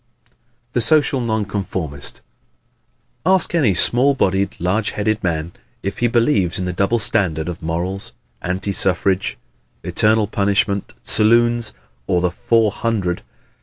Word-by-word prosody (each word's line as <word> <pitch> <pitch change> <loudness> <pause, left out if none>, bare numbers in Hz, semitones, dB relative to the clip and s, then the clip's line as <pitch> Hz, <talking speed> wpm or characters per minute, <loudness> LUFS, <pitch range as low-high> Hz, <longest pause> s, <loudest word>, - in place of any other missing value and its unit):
The 120 - +2
Social 145 -2 +4
Nonconformist 95 -9 -3 1.0
¶ 185 - +4
Ask 190 -2 +2
any 135 - +2
small 130 +10 +4
bodied, 95 -4 0
large 95 +5 0
headed 110 +1 -1
man 85 -2 -2 0.3
if 100 - -4
he 120 - +2
believes 115 - +1
in 95 - -2
the 90 - -3
double 100 +6 +1
standard 95 -8 0
of 90 -1 -6
morals, 85 +4 -4 0.3
anti 95 +3 -2
suffrage, 95 +1 0 0.5
eternal 110 0 +2
punishment, 100 -1 0
saloons, 120 +1 +2 0.3
or 90 - +2
the 90 0 0
"four 110 +3 +1
hundred!" 100 -6 -2
100 Hz, 130 wpm, -19 LUFS, 90-115 Hz, 1.0 s, Social